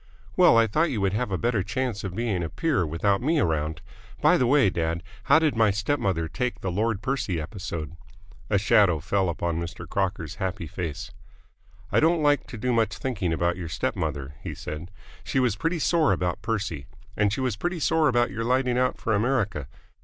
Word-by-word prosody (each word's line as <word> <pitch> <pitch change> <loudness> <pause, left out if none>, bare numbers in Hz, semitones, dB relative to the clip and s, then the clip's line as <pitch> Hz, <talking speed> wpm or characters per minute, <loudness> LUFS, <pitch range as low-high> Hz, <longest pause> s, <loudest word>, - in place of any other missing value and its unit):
"Well, - - +6
I 115 - +6
thought 155 +10 +1
you 120 -7 -2
would 95 0 +1
have 110 +2 -1
a 95 - -1
better 115 -1 +1
chance 125 0 -2
of 95 -2 -5
being 110 -5 -1
a 85 - -3
peer 145 - 0
without 100 +7 +1
me 155 +5 +2
around. 80 - -1 0.4
By 180 - +5
the 130 -8 +2
way, 135 -7 +4
dad, 85 0 -2 0.2
how 145 +2 +6
did 155 -4 +2
my 110 -1 +4
step 105 +8 0
mother 95 -8 0
take 125 +9 -3
the 95 - -2
Lord 110 +2 -1
Percy 125 -10 -1
episode?" 80 -1 -5 0.5
A 100 - +3
shadow 100 -4 +4
fell 95 +4 0
upon 85 0 -2
Mr. 85 0 -6
Crocker's 90 -3 -2
happy 95 -1 -2
face. 80 -1 -5 0.8
"I - - +4
don't 160 0 +3
like 145 -1 +2
to 115 - -8
do 125 +3 0
much 115 -1 +1
thinking 100 -10 -2
about 85 +2 0
your 85 -3 -5
step - - -2
mother," 70 0 -3
he - - -6
said. 75 +4 -7 0.3
"She 135 - 0
was 125 -5 +2
pretty 165 - -1
sore 160 -1 +2
about 90 -1 -2
Percy. 100 - -3 0.3
And 105 -1 +2
she 110 - -2
was 130 -5 0
pretty 175 - -2
sore 160 0 +3
about 120 -4 +2
your 115 +3 -3
lighting 125 +1 +1
out 125 0 +1
for 110 - -1
America. 105 - 0
105 Hz, 205 wpm, -26 LUFS, 85-125 Hz, 0.8 s, Well